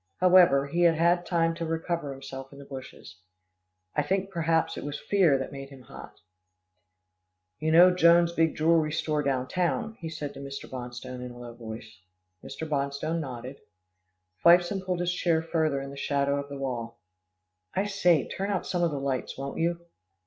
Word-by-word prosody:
However, 180 -7 +6
he 170 +5 -2
had 170 -2 +5
had 175 +2 +2
time 165 -1 +2
to 165 0 -5
recover 165 -2 -2
himself 135 0 -8
in 140 - -13
the 140 - -11
bushes. 130 -6 -10 0.8
I - - +3
think 195 +6 -1
perhaps 165 -2 +1
it - - -6
was 145 0 -5
fear 180 -9 +3
that 135 - -5
made 135 -1 -8
him 135 -2 -13
hot. 110 - -12 1.4
"You 160 +1 0
know 175 +3 +7
Jones' 170 -1 +5
big 165 -1 +2
jewelry 160 -1 +3
store 150 -1 0
down 130 -3 -1
town," 185 - -1
he 165 - -5
said 150 -3 -5
to 135 - -10
Mr. 140 0 -7
Bonstone 125 0 -7
in 125 - -6
a 120 - -11
low 120 -1 -9
voice. 110 -2 -9 0.4
Mr. 160 - -6
Bonstone 145 +2 -1
nodded. 130 -2 -7 0.8
Fifeson 175 +3 +5
pulled 180 -2 -2
his 175 0 0
chair 165 -2 +1
further 160 -4 0
in 135 0 -7
the - - -9
shadow 140 0 0
of 140 0 -6
the 140 - -6
wall. 120 -4 -4 0.8
"I 195 - +1
say, 180 -7 +2
turn 195 +1 -4
out 195 -3 -1
some 180 - -1
of 170 - +3
the 145 -3 -3
lights, 135 -2 -3
won't 135 +1 -5
you?" 170 +1 0
155 Hz, 185 wpm, -27 LUFS, 135-170 Hz, 1.4 s, know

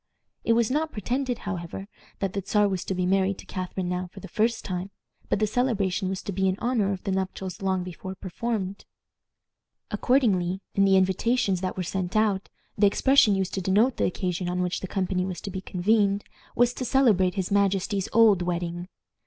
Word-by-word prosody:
It 230 - +3
was 230 0 +2
not 310 +3 0
pretended, 245 +4 -2
however, 190 0 -5 0.3
that 195 -1 -1
the 200 - -2
Czar 210 +2 +3
was 190 -2 -2
to 190 - -2
be 180 0 0
married 190 +1 +2
to - - -11
Catharine 185 0 -4
now 180 0 -2
for - - -11
the - - -9
first 225 +1 0
time, 185 0 -3 0.4
but - - +2
the 215 - +2
celebration 205 -5 0
was 190 0 -4
to - - -4
be 190 0 +1
in 185 0 0
honor 230 -5 +1
of 190 -2 -4
the 195 - -2
nuptials 190 -1 -3
long 190 -1 0
before 185 +1 -7
performed. 200 +1 -4 1.1
Accordingly, 195 -9 +2
in 195 - +3
the 195 -1 +5
invitations 190 +1 +1
that 185 0 -3
were 185 - -1
sent 185 +1 -3
out, 210 -3 +1 0.3
the 205 0 +5
expression 225 0 +4
used 190 -1 -2
to 190 - -1
denote 210 +8 +2
the - - +2
occasion 180 -1 -2
on 180 0 0
which 180 0 -1
the 190 - -5
company 185 -1 -1
was 185 -1 -4
to 200 - -6
be 190 0 -5
convened 200 +2 +1 0.3
was 245 +1 +3
"to 255 - -4
celebrate 220 -9 +3
his 190 -2 -2
majesty's 200 0 +1
old 215 -5 +5
wedding." 175 0 -3
195 Hz, 195 wpm, -26 LUFS, 185-215 Hz, 1.1 s, the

